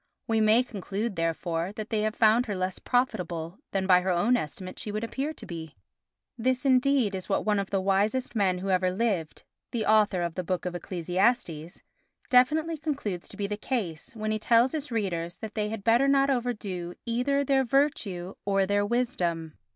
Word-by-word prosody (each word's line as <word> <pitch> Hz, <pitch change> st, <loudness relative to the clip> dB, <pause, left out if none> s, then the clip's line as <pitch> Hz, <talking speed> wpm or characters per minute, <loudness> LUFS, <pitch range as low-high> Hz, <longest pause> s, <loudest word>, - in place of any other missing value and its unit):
We 225 Hz, -1 st, +2 dB
may 215 Hz, +3 st, +5 dB
conclude, 205 Hz, -1 st, -4 dB
therefore, 165 Hz, +2 st, -1 dB
that 215 Hz, +1 st, -6 dB
they 215 Hz, -1 st, +1 dB
have 215 Hz, +1 st, -1 dB
found 230 Hz, +3 st, +4 dB
her 205 Hz, -, -2 dB
less 185 Hz, 0 st, -2 dB
profitable 180 Hz, -9 st, -1 dB
than 195 Hz, -1 st, -1 dB
by 180 Hz, -1 st, +6 dB
her 185 Hz, -, -2 dB
own 185 Hz, +8 st, +3 dB
estimate 185 Hz, -1 st, -5 dB
she 220 Hz, -5 st, -3 dB
would 215 Hz, +2 st, -3 dB
appear 270 Hz, +6 st, -2 dB
to -, -, -10 dB
be. 160 Hz, -3 st, -7 dB, 0.6 s
This 255 Hz, +3 st, 0 dB
indeed 260 Hz, -4 st, +3 dB
is 190 Hz, +1 st, -5 dB
what 195 Hz, -, 0 dB
one 210 Hz, -1 st, +2 dB
of 195 Hz, -, -3 dB
the 195 Hz, -, +1 dB
wisest 205 Hz, +7 st, +1 dB
men 190 Hz, -4 st, +2 dB
who 190 Hz, +1 st, -2 dB
ever 185 Hz, 0 st, +2 dB
lived—the 205 Hz, +2 st, -3 dB
author 210 Hz, -4 st, +3 dB
of 170 Hz, -1 st, -2 dB
the 185 Hz, -, -3 dB
Book 180 Hz, +1 st, -2 dB
of 180 Hz, -, -2 dB
Ecclesiastes—definitely 195 Hz, -, 0 dB
concludes 270 Hz, -, -3 dB
to 195 Hz, -, -11 dB
be 205 Hz, -, -1 dB
the 205 Hz, +1 st, -3 dB
case, 220 Hz, -2 st, -4 dB
when 215 Hz, -1 st, -2 dB
he 215 Hz, -, -1 dB
tells 235 Hz, +3 st, +4 dB
his 300 Hz, -2 st, -4 dB
readers 175 Hz, -6 st, -2 dB
that 220 Hz, 0 st, -7 dB
they 210 Hz, -1 st, -1 dB
had 220 Hz, -2 st, -5 dB
better 235 Hz, +5 st, +4 dB
not 275 Hz, 0 st, +4 dB
overdo 210 Hz, -9 st, -3 dB
either 250 Hz, +4 st, +1 dB
their 270 Hz, -1 st, +3 dB
virtue 225 Hz, -9 st, 0 dB
or 195 Hz, -1 st, +2 dB
their 205 Hz, +1 st, +1 dB
wisdom. 180 Hz, -9 st, -1 dB
210 Hz, 185 wpm, -27 LUFS, 185-245 Hz, 0.6 s, by